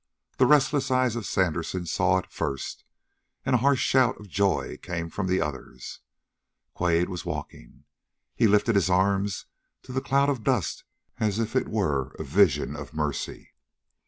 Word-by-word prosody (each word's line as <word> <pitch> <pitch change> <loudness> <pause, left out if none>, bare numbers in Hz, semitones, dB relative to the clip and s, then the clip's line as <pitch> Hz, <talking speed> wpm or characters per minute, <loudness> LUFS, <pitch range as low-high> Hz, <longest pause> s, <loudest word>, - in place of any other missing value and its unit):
The 130 - +6
restless 145 -1 +3
eye 130 0 +3
of 120 -3 -2
Sandersen 90 0 -1
saw 95 +2 +2
it 95 - -5
first, 70 -5 -4 0.6
and 135 - +1
a 125 - +4
harsh 135 +1 +3
shout 130 -2 +3
of 105 - -11
joy 100 +1 0
came 85 -2 -4
from 95 -2 -2
the 95 +1 +2
others. 65 -4 -6 0.7
Quade 85 0 +1
was 90 -2 -5
walking. - - -7 0.5
He 115 - +3
lifted 105 +3 +3
his 95 -4 +2
arms 95 +1 +1 0.4
to 130 - -10
the 130 - 0
cloud 140 +2 +2
of 130 -6 -2
dust 120 -6 0 0.3
as 105 -2 0
if 115 +1 -2
it 130 - +1
were 70 - -1
a - - -4
vision 75 -2 +2
of 75 +1 -9
mercy. 75 -2 -3
95 Hz, 160 wpm, -26 LUFS, 85-120 Hz, 0.7 s, The